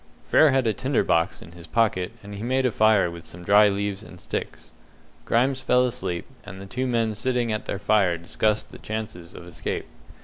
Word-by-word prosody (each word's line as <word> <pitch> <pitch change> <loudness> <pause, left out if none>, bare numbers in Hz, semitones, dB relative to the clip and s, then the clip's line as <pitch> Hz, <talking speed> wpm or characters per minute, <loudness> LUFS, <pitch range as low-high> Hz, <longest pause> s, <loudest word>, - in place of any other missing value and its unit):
Frere 155 - +5
had 135 -2 +2
a 110 - +2
tinder 130 +5 0
box 85 +3 0
in 80 - -14
his 85 -1 -13
pocket, 105 -5 +1
and 100 0 -9
he 100 - -7
made 130 +3 +1
a 125 - +2
fire 105 -5 +3
with 85 -1 -9
some 90 +1 -10
dry 105 +2 +6
leaves 100 0 -2
and 95 -4 -13
sticks. - - -6 0.5
Grimes 130 +3 +1
fell 125 -1 +3
asleep, 95 -8 -3 0.2
and 100 -2 -10
the 100 - -8
two 125 +7 -3
men 115 -3 +1
sitting 120 +2 -1
at 105 - -3
their - - -3
fire 100 -4 +2
discussed 105 +5 -1
the - - -11
chances 105 -6 -6
of 85 - -10
escape. 85 -2 -4
105 Hz, 205 wpm, -24 LUFS, 90-120 Hz, 0.5 s, dry